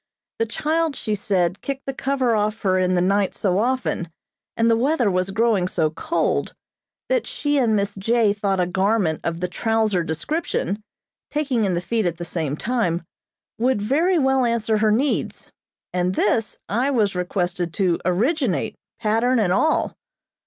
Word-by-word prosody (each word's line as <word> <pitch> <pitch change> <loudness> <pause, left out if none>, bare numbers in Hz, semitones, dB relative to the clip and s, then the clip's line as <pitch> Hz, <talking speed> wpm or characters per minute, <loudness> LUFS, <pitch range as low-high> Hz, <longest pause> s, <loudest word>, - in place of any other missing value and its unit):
The 225 - +1
child, 315 +5 0
she 215 - -2
said, 190 -3 0
kicked 275 -1 -4
the 270 - -3
cover 265 -3 0
off 215 +1 -1
her 185 -2 +2
in 185 0 +2
the 175 - +2
night 195 +1 +1
so 190 -1 +1
often, 245 -7 -1 0.5
and 230 - +3
the 230 - +5
weather 250 -2 +2
was 185 +1 0
growing 210 -3 +2
so 160 -4 0
cold, 315 - -1 0.5
that - - 0
she 290 -1 0
and 230 -4 +2
Miss 200 0 0
J. 215 +1 +2
thought 200 -2 -1
a 180 - +3
garment 190 -2 +1
of 170 0 -3
the 180 - 0
trouser 220 -2 +1
description, 205 - -2 0.5
taking 275 -7 0
in 185 -3 0
the 170 - -1
feet 220 +2 0
at 170 -1 -2
the 175 - -5
same 155 -4 -3
time, 185 -8 -1 0.6
would 250 -1 +2
very 310 - +2
well 265 -3 +3
answer 225 -2 +1
her 215 0 +3
needs, 265 +7 -1 0.4
and 180 +1 0
this 215 +1 +1
I 245 +6 +1
was 220 -7 +2
requested 180 -1 -2
to 180 -4 +1
originate, 210 - 0 0.2
pattern 225 +4 +2
and 195 -6 +2
all. 310 +10 +2
215 Hz, 165 wpm, -22 LUFS, 185-250 Hz, 0.6 s, the